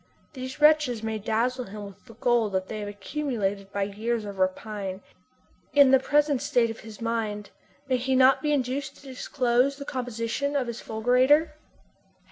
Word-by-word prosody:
These 260 0 -7
wretches 300 -7 +4
may 220 -1 -2
dazzle 245 +4 -1
him 205 +1 -8
with 200 -1 -13
the 230 - -14
gold 235 -4 +1
that 190 0 -1
they 215 - -4
have 205 - -5
accumulated 205 -3 -3
by 200 -1 -1
years 215 +3 -2
of 200 -1 -7
rapine. 190 0 -2 0.7
In 280 -2 +7
the 265 - +7
present 290 0 +2
state 245 -5 +2
of 225 - -9
his 220 -1 -11
mind 220 -3 -2 0.4
may 260 -1 +2
he 260 +2 0
not 260 +1 +5
be 300 - 0
induced 270 0 -1
to - - -18
disclose 255 0 0
the 280 - -7
composition 245 +3 -3
of 270 -3 +1
his 235 -1 -6
fulgurator? 250 +8 +3
240 Hz, 170 wpm, -26 LUFS, 215-270 Hz, 0.7 s, In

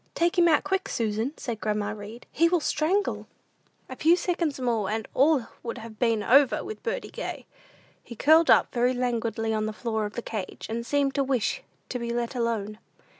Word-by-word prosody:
"Take 340 +1 +1
him 345 - +6
out 315 - +4
quick, 385 0 -1
Susan," 225 +4 -1
said 230 -4 -5
grandma 210 -1 -1
Read; 215 +3 -9
"he 335 +3 +3
will 350 0 +2
strangle." 340 +7 0 0.6
A - - -7
few 330 +3 +4
seconds 340 -5 -1
more 230 -6 0
and 220 0 -2
all 275 -2 +3 0.2
would 235 +1 -5
have 225 -2 -10
been 225 -3 +2
over 270 +5 +4
with 430 +3 -7
birdie - - -4
gay. - - -6 0.6
He 235 - -10
curled 315 +7 +5
down - - +6
very 245 +1 +1
languidly 230 -2 -1
on 215 0 0
the 215 - -4
floor 220 -1 -2
of 205 - -11
the 235 - -5
cage, 205 -5 -5
and 230 +1 -3
seemed 285 -1 +1
to 275 - +1
wish 265 - 0 0.3
to 250 - -3
be 235 0 -4
let 235 +1 -2
alone. 225 -4 -2
240 Hz, 195 wpm, -26 LUFS, 220-305 Hz, 0.6 s, him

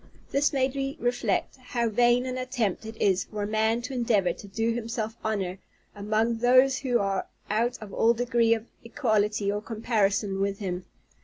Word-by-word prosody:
This 280 +2 +2
made 265 -1 +1
me 275 0 -3
reflect, 245 -1 0
how 245 -2 -2
vain 240 +3 +3
an 255 -1 -3
attempt 240 -5 -2
it 220 0 -9
is 190 -2 +2
for 210 -1 -5
a - - -2
man 220 +2 +1
to 250 - -5
endeavor 220 -8 +2
to 200 - -12
do 225 +4 0
himself 230 -1 -3
honor 195 -4 -2 0.3
among 215 +3 0
those 255 +2 +5
who 250 -3 +1
are 195 -3 -1 0.2
out 235 +3 +1
of 210 -2 -10
all 230 +1 +3
degree 235 -1 +3
of 225 0 -7 0.2
equality 215 -5 0
or 205 +1 -2
comparison 210 -3 0
with 200 0 0
him. 180 -3 -4
225 Hz, 175 wpm, -27 LUFS, 205-245 Hz, 0.3 s, those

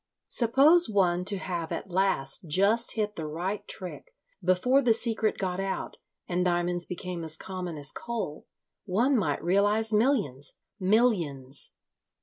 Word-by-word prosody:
Suppose 275 +8 +5
one 180 -4 +2
to 200 +1 +1
have 175 -3 -4
at 195 - -5
last 175 -5 +1
just 200 +9 +3
hit 210 -2 -2
the 160 -2 -5
right 180 +7 -4
trick 345 - -7 0.3
before 250 +10 +3
the 235 -4 +3
secret 225 -1 0
got 185 -1 -2
out 195 0 -4 0.3
and 180 0 0
diamonds 175 0 0
became 180 -1 -5
as 155 -1 0
common 180 -3 -6
as 145 0 +1
coal, 225 -11 -5 0.4
one 235 +8 +2
might 155 - 0
realize 205 +5 +2
millions. 210 - +1 0.2
Millions!" 180 - 0
190 Hz, 135 wpm, -27 LUFS, 175-220 Hz, 0.4 s, Suppose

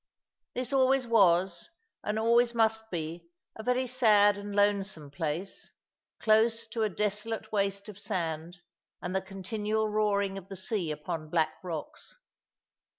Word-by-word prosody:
This 255 +2 -2
always 265 -1 +4
was, 190 - +3 0.3
and 210 +1 -1
always 235 +2 +3
must 220 -1 +2
be, 170 -1 -5 0.3
a - - -7
very 250 +3 +1
sad 215 -5 +5
and 205 0 -6
lonesome 200 -7 +1
place, 165 +4 -4 0.5
close 225 +1 +3
to 225 - -3
a 215 - +2
desolate 210 +3 -2
waste 200 -1 -1
of 205 -2 -10
sand, 170 -4 -3 0.4
and 180 +1 -4
the 190 - +2
continual 210 +3 -2
roaring 200 -2 +1
of 190 - -16
the 195 - -6
sea 190 -2 -2
upon 155 +1 -4
black 160 -1 +1
rocks. 165 -5 -6
205 Hz, 140 wpm, -29 LUFS, 180-220 Hz, 0.5 s, sad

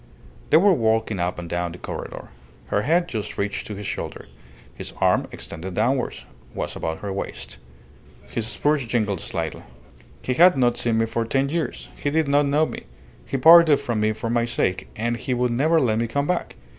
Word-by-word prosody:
They 155 - +7
were 195 +3 +5
walking 110 - +1
up 90 +1 -1
and 85 -1 -6
down 85 0 -2
the - - -9
corredor. - - -7 0.4
Her 100 - +1
head 170 +8 +2
just 110 -6 -5
reached 100 0 -2
to 105 - -6
his 100 +1 -7
shoulder. - - -5 0.5
His - - -7
arm, - - +2
extended 85 +2 -7
downwards, 125 +4 0 0.3
was - - -4
about 80 0 -4
her 100 -2 -4
waist. 100 - -6 0.7
His 110 -1 -3
spurs 145 +4 +1
jingled 105 -6 0
slightly. 80 -2 -4 0.6
"He 130 - 0
had 175 +4 +6
not 120 -2 +2
seen 115 -2 +1
me 115 - +2
for 115 +1 -2
ten 135 +4 0
years. 165 +1 -3
He 145 - -2
did 155 0 +1
not 145 +1 +3
know 150 +3 +3
me. - - -7 0.4
He - - -1
parted 160 +1 +8
from 120 -3 -2
me 110 0 +2
for 115 +1 -4
my 120 0 +2
sake, 95 -6 -1
and 120 +2 -1
he 125 +1 -2
would 125 0 +1
never 155 +7 +3
let 110 -6 +1
me 115 - 0
come 140 +5 -1
back. 180 +2 -2
120 Hz, 195 wpm, -23 LUFS, 105-145 Hz, 0.7 s, parted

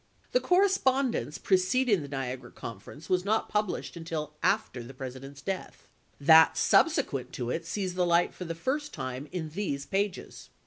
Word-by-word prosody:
The - - +4
correspondence 275 - +2
preceding 205 +2 +2
the 145 - -6
Niagara 130 -2 -4
conference 115 +9 -9
was 180 -1 +1
not 215 +3 0
pub 210 0 +1
lished - - -5
until 160 -2 -4
after 210 - +1
the 125 +3 -10
President's 130 +1 -8
death; 190 -1 -5 0.3
that 160 +3 +7
sub - - +5
sequent - - -2
to 120 0 -3
it 165 +3 -3
sees 190 -2 -2
the 180 0 +1
light 175 0 +3
for 180 - -7
the 165 0 -4
first 285 - -2
time 130 +3 -5
in 165 -4 -4
these 150 -5 -3
pages. 200 -1 -3
170 Hz, 170 wpm, -29 LUFS, 140-205 Hz, 0.3 s, that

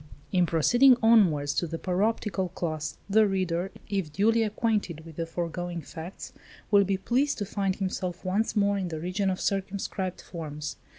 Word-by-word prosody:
In 180 -2 +3
proceeding 240 - +5
onwards 175 -11 +4
to 170 - 0
the 165 +1 -4
paroptrical 190 -1 -1
class, 155 -3 -3
the 215 +1 +4
reader, 185 -2 -1 0.2
if 195 -6 -2
duly 225 +7 +3
acquainted 210 -7 -1
with 165 -2 -11
the 165 0 -3
foregoing 170 0 -4
facts, 165 +5 -8 0.4
will 200 -1 +6
be 195 0 0
pleased 260 +9 +1
to 205 - -2
find 195 -1 -1
himself 185 -2 -3
once 205 +6 0
more 200 -1 +2
in 185 - -2
the 160 -2 -4
region 185 +4 -1
of 185 - -2
circumscribed 195 -1 -2
forms. 150 -3 -6
185 Hz, 165 wpm, -27 LUFS, 170-205 Hz, 0.4 s, will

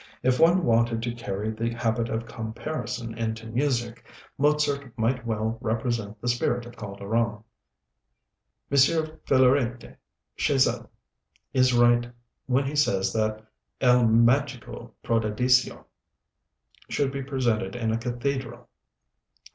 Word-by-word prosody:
If 125 0 +2
one 175 +2 +5
wanted 115 -1 +2
to 120 0 -2
carry 110 -2 -4
the 115 +1 -2
habit 115 0 -1
of 110 +1 -3
comparison 115 +1 -5
into 115 0 -3
music, 120 -1 -1 0.3
Mozart 140 -3 0
might 115 +1 0
well 110 0 -2
represent 110 -2 -2
the 120 - -6
spirit 120 0 0
of 120 - -12
Calderon. 105 +2 -2 1.3
M. 140 - +2
Philarète 135 -4 +2 0.4
Chasles - - +2 0.7
is 130 -2 +3
right 120 0 +4 0.4
when 130 +2 +2
he 140 +2 -3
says 100 -10 +1
that 110 0 -1 0.3
'El 125 -1 +4
Mágico 120 +3 +1
Prodigioso' 115 +3 +1 1.0
should 140 -2 0
be 140 0 -4
presented 125 -6 -1
in 115 -2 -1
a 110 - 0
cathedral. 130 +3 -4
120 Hz, 115 wpm, -26 LUFS, 115-130 Hz, 1.3 s, one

